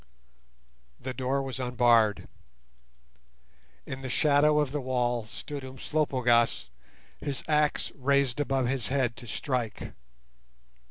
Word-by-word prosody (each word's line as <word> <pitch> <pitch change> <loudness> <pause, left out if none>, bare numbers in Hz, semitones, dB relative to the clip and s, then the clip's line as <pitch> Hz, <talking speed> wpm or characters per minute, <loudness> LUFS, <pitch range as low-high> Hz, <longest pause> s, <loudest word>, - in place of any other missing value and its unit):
The 130 0 -5
door 135 +2 -1
was 135 -1 -5
unbarred. 120 -4 +3 1.6
In 130 0 -6
the 130 - -5
shadow 150 +3 +4
of 145 -3 0
the 145 0 -2
wall 120 -3 -1
stood 145 +4 -7
Umslopogaas, 125 - +1 0.5
his 140 -3 -3
axe 150 -1 +1
raised 140 -1 +1
above 135 -3 +1
his 125 -4 -1
head 130 -3 0
to 120 - -11
strike. 120 -2 -3
130 Hz, 110 wpm, -28 LUFS, 120-140 Hz, 1.6 s, shadow